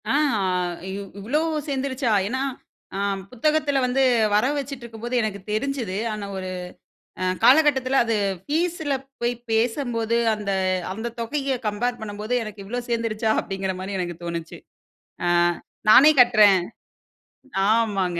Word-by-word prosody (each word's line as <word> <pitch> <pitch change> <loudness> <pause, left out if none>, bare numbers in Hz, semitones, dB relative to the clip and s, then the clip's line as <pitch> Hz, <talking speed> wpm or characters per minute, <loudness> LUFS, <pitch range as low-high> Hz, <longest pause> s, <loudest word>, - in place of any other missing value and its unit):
ஆ, - - +2 0.3
அ - - 0 0.5
இவ் 195 0 -6
இவ்வளோ 240 +10 0 0.3
சேர்ந்துருச்சா? 265 -3 -1 0.2
ஏனா, 260 +5 -2 0.5
அ - - -2 0.3
புத்தகத்தில 285 +2 +1
வந்து 255 +2 +2 0.3
வர 210 - +3
வச்சுட்ருக்கும்போது 240 -4 -5
எனக்கு 210 -2 -3
தெரிஞ்சது. 230 -4 -2 0.2
ஆனா 210 -1 -5
ஒரு 185 -1 -5 0.7
அ - - +1 0.2
காலகட்டத்தில 270 -2 +5
அது 230 -1 0 0.3
ஃபீஸ்ல 320 -1 -1 0.3
போய் 240 +1 0 0.2
பேசும்போது 230 0 0 0.2
அந்த, 205 -2 -3 0.4
அந்த 225 +4 -5
தொகைய 275 +3 -1
கம்பேர் 240 +4 -2
பண்ணும்போது 215 +2 -4
எனக்கு 210 -1 -8
இவ்வளோ 245 +5 -3
சேர்ந்துருச்சா? 230 -1 0
அப்படிங்கிற 190 -1 -3
மாரி 195 +1 -4
எனக்கு 175 -2 -4
தோணுச்சு. 170 -1 -5 0.7
ஆ - - +2 0.6
நானே 280 +7 +9
கட்டுறேன். 215 -5 +6 1.1
ஆமாங்க. 200 -6 +1
230 Hz, 120 wpm, -23 LUFS, 205-265 Hz, 1.1 s, நானே